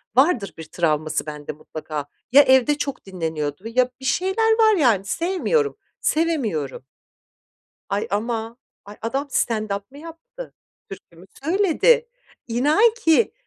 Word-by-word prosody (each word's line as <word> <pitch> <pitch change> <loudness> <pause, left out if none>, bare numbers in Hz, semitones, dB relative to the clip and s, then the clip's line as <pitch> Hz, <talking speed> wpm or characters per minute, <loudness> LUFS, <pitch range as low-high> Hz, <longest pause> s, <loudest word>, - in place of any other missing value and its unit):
Vardır 260 - +3
bir 160 - -7
travması 155 -2 -1
bende 150 -1 -6
mutlaka. 150 -1 -7 0.2
Ya, 285 +2 +9
evde 265 +2 +4
çok 280 -6 -4
dinleniyordu 160 -3 -4
ya, 250 +2 +2
bir 265 - -9
şeyler 385 - +1
var 435 -1 +5
yani 225 - +3
sevmiyorum, 385 - 0 0.2
sevemiyorum. 225 - -1 1.0
Ay 200 +1 -1
ama 225 +2 -2 0.3
ay 205 +1 -11
adam 270 +5 -2
stand-up 215 -4 -1
mı 280 - -13
yaptı? 335 +11 -11 0.3
Türkü 190 -3 -12
mü 180 +3 -15 0.2
söyledi? 410 +7 +3 0.4
İnan 305 - +3
ki, 420 -2 +2
250 Hz, 125 wpm, -22 LUFS, -, 1.0 s, Ya